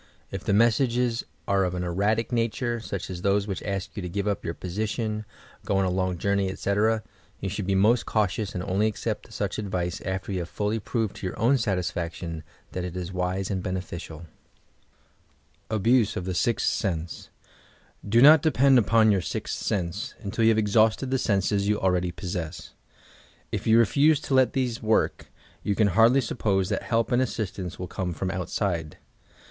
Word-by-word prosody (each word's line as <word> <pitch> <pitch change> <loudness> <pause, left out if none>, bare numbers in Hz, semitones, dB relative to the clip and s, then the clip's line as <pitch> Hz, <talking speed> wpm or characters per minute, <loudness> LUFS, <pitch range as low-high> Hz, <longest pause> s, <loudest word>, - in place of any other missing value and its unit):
If - - -5
the - - -1
messages 120 +2 +2 0.2
are 100 -1 +2
of 90 -1 -1
an 90 - -2
erratic 105 +6 0
nature, 120 0 -1
snch 100 -5 -5
as 90 -1 -6
those 100 +1 +2
which 100 -3 -4
ask 100 -1 -3
you 105 - -4
to 90 - -5
give 100 +3 -2
up 100 - -1
your 85 - -3
position, 110 +3 -3 0.4
go 100 - 0
on 95 - +2
a 90 - 0
long 95 -1 -1
journey, 100 +1 +1
etc., 105 +3 +1 0.4
you 95 - -3
should 100 0 -4
be 100 - +2
most 110 +5 +3
cautious 105 -1 0
and 90 - -2
only 100 +3 +1
accept 110 - -4
such - - -3
advice 90 -4 -3
after 95 +1 -4
yon 95 - -1
have 85 -1 -5
fully 105 +2 -1
proved 110 -1 -2
to 95 - -4
your - - -6
own 130 +5 +3
satisfaction 90 -5 -2 0.3
that 90 - -4
it 90 0 -5
is 90 +1 -5
wise 90 +1 -2
and 95 -2 -1
beneficiaL 85 -3 -5 1.4
ABUSE 110 +1 +2
OF 90 - -3
THE 95 - -2
"sEXTH 115 +6 +1
SENSE" 85 -4 -2 0.8
Do 115 +4 +5
not 150 +1 +9
depend 135 -4 +5
upon 110 0 +4
your 95 -2 +2
"siith - - -4
sense" 85 -4 -2
until 100 +3 -2
yoa - - +5
have 115 -1 +4
exhausted 110 +4 +2
the 130 - +1
senses 100 -2 +1
you 105 0 +1
already 90 -1 +1
possess. 85 -3 -5 0.8
If - - -3
you 110 +1 +6
refuse 140 +6 +4
to - - -3
let 130 -3 +4
these 125 -3 -1
work, 110 -1 +1 0.3
you 100 - -1
can 105 -1 +3
hardly 115 +7 +5
suppose 95 -5 0
that 100 - -1
help 115 +1 0
and 125 +1 +3
assistance 100 -7 -3
will 90 - -4
come 90 -1 -3
from 95 +3 -3
outside. 90 -3 -2
100 Hz, 185 wpm, -26 LUFS, 90-115 Hz, 1.4 s, not